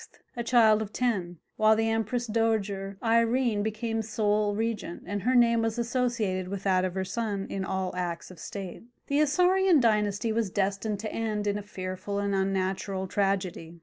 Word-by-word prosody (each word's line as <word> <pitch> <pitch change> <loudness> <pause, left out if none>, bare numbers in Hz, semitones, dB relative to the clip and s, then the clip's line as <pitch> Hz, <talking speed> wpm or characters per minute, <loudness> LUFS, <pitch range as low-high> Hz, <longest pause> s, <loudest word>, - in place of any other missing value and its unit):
a 240 - -3
child 225 -3 +5
of 215 -1 -5
ten, 195 -8 -1 0.2
while 215 0 +5
the 225 +1 +1
Empress 225 +2 0
Dowager 210 -3 -1
Irene 230 -1 +2
became 225 +1 -2
sole 210 -1 0
regent, 220 -5 -3
and 205 0 -3
her 255 +4 +1
name 235 -1 +5
was 225 0 -1
associated 235 -6 -1
with 195 +1 -5
that 185 -2 +2
of 185 -1 -2
her 190 0 -1
son 205 -1 -2
in 195 - -2
all 190 -1 -2
acts 175 -1 -4
of 180 - -13
state. 190 +1 -7 0.2
The 285 +1 +1
Isaurian 360 +3 +4
dynasty 210 -2 +1
was 220 -2 0
destined 200 +2 -1
to 215 - -5
end 215 -2 -2
in 205 0 0
a - - -5
fearful 190 0 -5
and 200 0 -1
unnatural 190 0 -1
tragedy. 185 -4 -2
210 Hz, 175 wpm, -28 LUFS, 195-230 Hz, 0.2 s, child